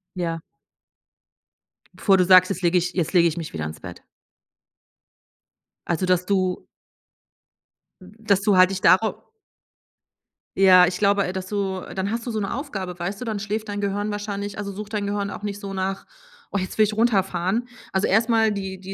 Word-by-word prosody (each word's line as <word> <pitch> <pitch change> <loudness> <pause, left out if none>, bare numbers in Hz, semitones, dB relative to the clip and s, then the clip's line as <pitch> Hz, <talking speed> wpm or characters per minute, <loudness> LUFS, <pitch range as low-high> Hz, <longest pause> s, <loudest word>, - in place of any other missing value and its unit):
Ja. 165 -2 -2 1.5
Bevor 195 -2 +3
du 180 - +3
sagst: 185 0 +7
„Jetzt 180 - -3
lege 175 +1 +3
ich 180 +1 -1
jetzt 175 -4 -2
lege 170 -2 +5
ich 165 0 -3
mich 165 -2 -6
wieder 80 -2 -4
ins 80 0 -7
Bett.“ - - -10 1.8
Also, 175 +2 0
dass 180 0 +1
du 185 -2 0 1.4
hm, 185 +2 -14
dass 200 -3 +1
du 205 -1 +3
halt 185 +1 +6
dich 190 -1 -4
darauf 200 +5 +3 1.3
Ja, 185 -2 +7
ich 180 +1 -2
glaube, 200 -1 +3
äh, 180 - -4
dass 190 0 -5
du 195 -2 -2
dann 190 +1 -2
hast 230 +2 -4
du - - -2
so 220 - -2
'ne 195 -2 -3
Aufgabe, 195 - -5
weißt 195 +4 -4
du? 250 - -6
Dann 220 -3 -3
schläft 215 +1 -4
dein 205 0 -3
Gehirn 205 +1 -2
wahrscheinlich 205 -1 -5
also, 200 -1 -4
sucht 205 +2 -8
dein 205 -1 -1
Gehirn 200 0 -2
auch - - -8
nicht 205 -1 -4
so 200 -1 -7
nach: 190 0 -3 0.5
„Oh, - - -1
jetzt 185 -1 -5
will 215 - +5
ich 210 - -3
runterfahren.“ 205 -1 0 0.2
Also, 190 +1 +1
erst 225 +5 +2
mal 225 -2 +3
die 190 -2 -5
die 190 +1 -8
195 Hz, 190 wpm, -23 LUFS, 185-205 Hz, 1.8 s, sagst